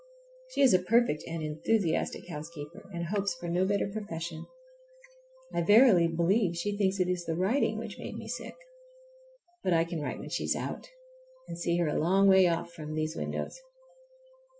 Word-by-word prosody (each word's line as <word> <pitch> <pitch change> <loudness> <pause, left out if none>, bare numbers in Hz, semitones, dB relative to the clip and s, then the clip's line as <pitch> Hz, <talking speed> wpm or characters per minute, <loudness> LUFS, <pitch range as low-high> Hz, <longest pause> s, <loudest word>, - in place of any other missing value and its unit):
She - - -2
is 265 -6 +6
a 185 - +5
perfect, 230 -4 +2
and 165 -1 -4
enthusiastic 165 +5 -1
housekeeper, 155 +1 -8
and 170 -2 -4
hopes 200 0 -1
for 175 0 -7
no 175 +2 +1
better 200 0 +1
profession. 170 -6 -6 1.1
I - - +1
verily 205 -2 +6
believe 170 +3 +1
she 205 +4 -2
thinks 195 -1 +1
it 180 - +2
is 180 -1 -2
the 165 - -2
writing 215 +5 +1
which 220 -3 -7
made - - -6
me - - -8
sick! - - -6 1.1
But 185 - +2
I 165 0 +4
can 170 -1 -4
write 145 - -3
when - - -8
she - - -2
is - - +1
out, - - -5 0.6
and - - -6
see 170 0 0
her 170 -2 +1
a 150 - 0
long 190 +5 +4
way 190 -1 +7
off 170 0 -1
from 155 -2 -6
these 155 +1 -2
windows. - - -4
175 Hz, 180 wpm, -29 LUFS, 165-200 Hz, 1.1 s, way